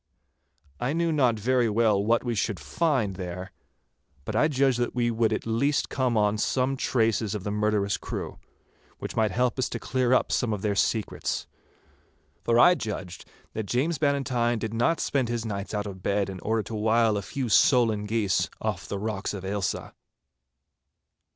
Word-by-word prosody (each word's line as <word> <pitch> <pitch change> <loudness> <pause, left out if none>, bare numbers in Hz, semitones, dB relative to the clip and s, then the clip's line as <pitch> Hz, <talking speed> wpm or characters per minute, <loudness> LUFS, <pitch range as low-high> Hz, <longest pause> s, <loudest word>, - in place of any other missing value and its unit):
I 125 +4 -1
knew 170 0 +1
not 130 -7 +2
very 120 +2 +2
well 105 -2 +2
what 115 +2 +2
we 120 -2 -1
should 105 -3 -1
find 110 - 0
there, 90 +1 -6 0.7
but - - -4
I 150 - +4
judged 135 -4 +2
that 120 - -1
we 120 -1 +1
would 115 -1 +1
at 110 - -2
least 135 +6 +1
come 125 -4 0
on 105 0 +2
some 130 +4 +1
traces 110 -4 0
of 100 - -5
the 105 - -3
murderous 105 -1 +1
crew, - - -6 0.6
which - - -6
might 110 -1 +2
help 125 +5 0
us 130 - 0
to - - -4
clear 130 -2 0
up 130 - +3
some 120 -4 +1
of 100 - -4
their 105 -1 +1
secrets. 105 +1 -1 1.0
For 115 - +2
I 175 +9 +7
judged 100 - -5 0.3
that 110 -2 -4
James 145 +8 0
Bannatyne 130 -5 +1
did 110 0 -4
not 120 +8 +1
spend 130 -4 0
his 120 -1 -2
nights 100 -2 -4
out 105 -1 -2
of 95 -2 -7
bed 100 0 0
in 95 - -8
order 110 +2 -1
to 105 - -8
wile 110 +1 +2
a 100 - -1
few 130 +5 -4
solan 115 -3 +4
geese 105 -3 +1
off - - -3
the 100 - -3
rocks 105 0 -3
of 95 -1 -7
Ailsa. 100 -1 -3
115 Hz, 180 wpm, -26 LUFS, 105-125 Hz, 1.0 s, I